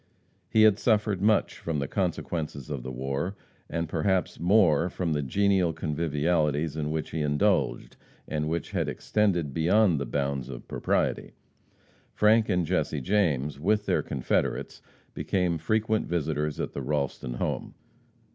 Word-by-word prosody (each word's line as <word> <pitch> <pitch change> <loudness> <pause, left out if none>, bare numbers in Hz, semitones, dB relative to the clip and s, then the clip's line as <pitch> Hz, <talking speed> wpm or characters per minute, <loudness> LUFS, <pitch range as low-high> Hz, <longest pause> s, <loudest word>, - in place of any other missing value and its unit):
He 110 - +4
had 105 -1 +5
suffered 105 -4 +1
much 110 +1 +2
from 80 -2 -3
the 70 -1 -2
consequences 80 -6 -3
of 70 -4 -3
the 65 +2 -6
war, 70 +9 -3 0.3
and 85 0 -2
perhaps 90 +4 0
more 90 -3 +4
from 85 -3 -2
the 75 - 0
genial 95 +4 +2
convivialities 75 -1 0
in 75 -1 -2
which 80 0 -3
he 80 - -2
indulged, 75 -4 0 0.3
and 75 0 -2
which 85 +1 -3
had - - -1
extended 90 -9 0
beyond 90 +1 +3
the 70 - -3
bounds 70 -2 -2
of - - -8
propriety. - - -1 0.8
Frank 110 +1 +4
and 90 -1 +1
Jesse - - 0
James, 75 -9 0
with 105 +6 +1
their - - +1
confederates, 65 -3 -2 0.3
became 90 -3 0
frequent 110 +5 0
visitors 75 -3 -1
at - - -3
the - - -4
Ralston 70 -4 -2
home. - - -3
80 Hz, 145 wpm, -27 LUFS, 75-95 Hz, 0.8 s, had